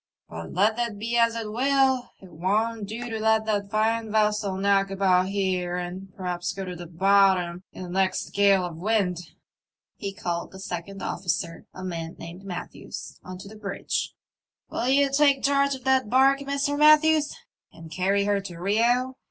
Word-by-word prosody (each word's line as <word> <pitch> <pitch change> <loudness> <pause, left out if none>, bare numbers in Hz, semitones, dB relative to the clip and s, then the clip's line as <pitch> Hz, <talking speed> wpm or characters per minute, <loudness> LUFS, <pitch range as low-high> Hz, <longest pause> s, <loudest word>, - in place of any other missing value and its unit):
But 80 0 -8
let 210 +5 +2
that 235 -3 -2
be 230 +3 -3
as 230 -1 +3
it 225 -2 -4
will, 265 +1 +2
it 190 -2 -15
won't 210 +5 -1
do 235 +4 -5
to 225 -2 -4
let 220 0 +2
that 205 -2 -1
fine 220 +1 0
vessel 210 -2 +1
knock 195 0 +2
about 190 -2 +2
here 185 -3 -1
and 180 +2 -6
perhaps 180 -1 -3
go 195 0 -5
to 180 -1 -6
the 175 0 -8
bottom 185 0 +3
in - - -8
the 180 - -7
next 190 +1 0
gale 200 -2 +4
of 170 -2 -7
wind." 190 -2 0 0.8
He 200 -2 -4
called 175 -3 -4
the 190 - -10
second 190 +1 -6
ofl&cer, 170 -2 -3
a 185 - -8
man 165 -3 -5
named 170 +3 -10
Matthews, 180 -3 -8
on 185 0 -8
to 195 +2 -11
the 215 - -11
bridge. 205 -2 -3 0.3
'* - - -60
Will 240 - -2
ye 280 +2 +4
take 275 -1 +3
charge 280 0 +2
of 260 - -12
that 265 -4 +2
barque, 270 +3 +4
Mr. 280 +1 -1
Matthews, 305 0 +5 0.4
and 165 -1 -13
carry 195 +4 +1
her 205 -1 +1
to 180 -3 -8
Rio 240 +7 +1
200 Hz, 180 wpm, -25 LUFS, 185-235 Hz, 0.8 s, Matthews